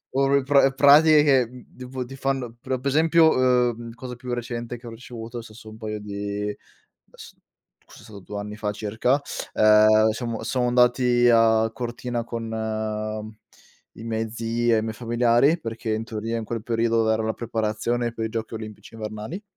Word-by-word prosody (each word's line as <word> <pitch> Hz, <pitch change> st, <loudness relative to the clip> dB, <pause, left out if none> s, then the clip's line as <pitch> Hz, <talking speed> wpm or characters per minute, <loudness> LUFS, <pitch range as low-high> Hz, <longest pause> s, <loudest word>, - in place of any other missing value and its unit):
Or 135 Hz, +1 st, +2 dB
pra 140 Hz, 0 st, +4 dB
pratiche 150 Hz, +2 st, +6 dB
che, 135 Hz, -4 st, +4 dB
mhmm, 125 Hz, 0 st, -15 dB
tipo 130 Hz, 0 st, -6 dB
ti 135 Hz, +2 st, -10 dB
fanno 135 Hz, -3 st, -2 dB
per 130 Hz, +1 st, -2 dB
per 130 Hz, -, -12 dB
esempio, 160 Hz, +2 st, +5 dB
uhm, 125 Hz, -2 st, +1 dB
cosa 125 Hz, +1 st, -8 dB
più 125 Hz, 0 st, -6 dB
recente 120 Hz, 0 st, -5 dB
che 120 Hz, -, -14 dB
ho -, -, -6 dB
ricevuto, 115 Hz, 0 st, -8 dB
se 115 Hz, -1 st, -13 dB
so' 110 Hz, 0 st, -12 dB
un 110 Hz, -, -12 dB
paio 110 Hz, -1 st, -5 dB
di 105 Hz, 0 st, -4 dB, 0.6 s
s -, -, -12 dB, 0.5 s
forse -, -, -16 dB
è -, -, -16 dB
stato 105 Hz, -2 st, -11 dB
2 100 Hz, +2 st, -7 dB
anni 105 Hz, +1 st, -6 dB
fa 105 Hz, -1 st, -2 dB
circa, 110 Hz, +6 st, 0 dB, 0.3 s
ehm, 110 Hz, 0 st, +5 dB
siamo 115 Hz, -1 st, -4 dB
siamo 125 Hz, +1 st, 0 dB
andati 125 Hz, 0 st, +3 dB
a 115 Hz, -1 st, +4 dB
Cortina 120 Hz, 0 st, -4 dB
con 115 Hz, 0 st, -5 dB, 1.5 s
i 110 Hz, -, -10 dB
miei 110 Hz, -1 st, -2 dB
zii 115 Hz, +1 st, -1 dB
e -, -, +3 dB
i -, -, -1 dB
miei 110 Hz, 0 st, -3 dB
familiari 120 Hz, +6 st, +2 dB
perché 115 Hz, -5 st, -4 dB
in 110 Hz, +1 st, -2 dB
teoria 115 Hz, 0 st, -4 dB
in 115 Hz, -, -5 dB
quel 115 Hz, 0 st, -4 dB
periodo 115 Hz, -1 st, +1 dB
era 110 Hz, 0 st, +1 dB
la 110 Hz, -, 0 dB
preparazione 115 Hz, +1 st, -2 dB
per 115 Hz, -1 st, -4 dB
i -, -, -4 dB
Giochi 115 Hz, 0 st, -5 dB
Olimpici 110 Hz, 0 st, -9 dB
Invernali. 110 Hz, -, -6 dB
115 Hz, 180 wpm, -24 LUFS, 110-125 Hz, 1.5 s, pratiche